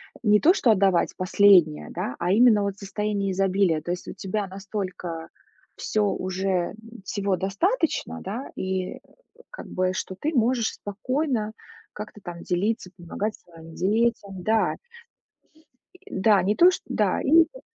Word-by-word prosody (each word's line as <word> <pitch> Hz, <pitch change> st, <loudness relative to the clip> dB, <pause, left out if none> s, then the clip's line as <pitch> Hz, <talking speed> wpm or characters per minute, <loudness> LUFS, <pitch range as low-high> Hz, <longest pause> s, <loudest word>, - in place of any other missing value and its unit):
Э, -, -, -15 dB
не 210 Hz, -2 st, +4 dB
то 345 Hz, -, +5 dB
что 250 Hz, -, +1 dB
отдавать 195 Hz, -4 st, +3 dB
последнее, 185 Hz, -4 st, +4 dB
да, 125 Hz, -, -4 dB
а 175 Hz, +1 st, 0 dB
именно, 220 Hz, -1 st, +5 dB
вот, 200 Hz, -1 st, -2 dB
состояние 200 Hz, 0 st, -2 dB
изобилия. 190 Hz, -4 st, +1 dB
То 175 Hz, -, -4 dB
есть, 180 Hz, -, -5 dB
у -, -, -6 dB
тебя 200 Hz, +2 st, -3 dB
настолько 185 Hz, -4 st, -6 dB, 0.5 s
всё 215 Hz, -1 st, -1 dB
уже, 185 Hz, -1 st, -1 dB, 0.3 s
всего 200 Hz, -2 st, -1 dB
достаточно, 325 Hz, -, -1 dB
да, 225 Hz, +8 st, -5 dB
и, 185 Hz, -1 st, -3 dB, 0.5 s
как -, -, -10 dB
бы, 185 Hz, 0 st, 0 dB
что 185 Hz, -, -4 dB
ты 310 Hz, +2 st, -1 dB
можешь 235 Hz, -1 st, +2 dB
спокойно 225 Hz, +1 st, -2 dB, 0.4 s
как-то 210 Hz, 0 st, -9 dB
там 170 Hz, -1 st, -8 dB
делиться, 190 Hz, +1 st, -1 dB
помогать 200 Hz, +4 st, -4 dB
своим 165 Hz, -1 st, -15 dB
детям. 200 Hz, -1 st, 0 dB
Да. 220 Hz, 0 st, +1 dB, 1.3 s
И -, -, -12 dB
да, 200 Hz, 0 st, +4 dB
не 205 Hz, +3 st, +1 dB
то, 360 Hz, +2 st, +7 dB
что -, -, -5 dB
да -, -, +1 dB
и -, -, -4 dB
ещё. 330 Hz, +10 st, +4 dB
200 Hz, 150 wpm, -25 LUFS, 185-220 Hz, 1.3 s, то